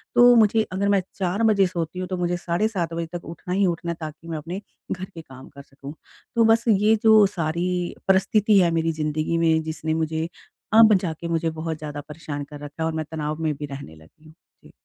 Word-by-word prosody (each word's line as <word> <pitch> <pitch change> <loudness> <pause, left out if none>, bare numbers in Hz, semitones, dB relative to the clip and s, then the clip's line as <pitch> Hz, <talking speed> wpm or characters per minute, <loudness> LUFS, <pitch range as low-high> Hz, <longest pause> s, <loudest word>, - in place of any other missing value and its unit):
तो 245 0 +8
मुझे 220 -1 +4
अगर 195 +2 0
मैं 200 -1 +3
4 195 +3 -1
बजे 205 -4 +4
सोती 175 0 -4
हूँ, 185 - -3
तो 185 0 -3
मुझे 175 0 -1
साढ़े 175 +4 0
7 175 -6 -3
बजे 165 0 -2
तक 170 - -14
उठना 170 +2 -6
ही 195 +1 +2
उठना 170 0 -2
है - - -4
ताकि 155 +1 -8
मैं 165 -1 -4
अपने 170 +6 -6 0.3
घर 185 0 -3
के 170 -3 -11
काम 130 -3 -13
कर 140 - -12
सकूँ। 140 +1 -11 0.4
तो 230 - +4
बस 225 +1 +4
ये 215 0 +4
जो 220 -2 +7
सारी 175 0 -2
परिस्थिति 200 +2 +4
है 175 -2 +3
मेरी 165 0 +1
ज़िंदगी 155 +1 -1
में 160 -1 +3
जिसने 160 0 -3
मुझे 160 0 -1 0.5
अब 220 -1 +8
जाके 170 -1 -4
मुझे 165 0 0
बहुत 160 0 -4
ज़्यादा 150 -1 -6
परेशान 150 -2 -6
कर 145 +1 -11
रखा 145 0 -9
है - - +1
और 160 - -1
मैं 160 0 -3
तनाव 155 -1 -3
में 155 -1 +1
भी 145 +1 -6
रहने 140 - -9
लगी 80 - -21
हूँ। 155 - -15 0.3
जी। - - -16
170 Hz, 225 wpm, -23 LUFS, 155-190 Hz, 0.5 s, तो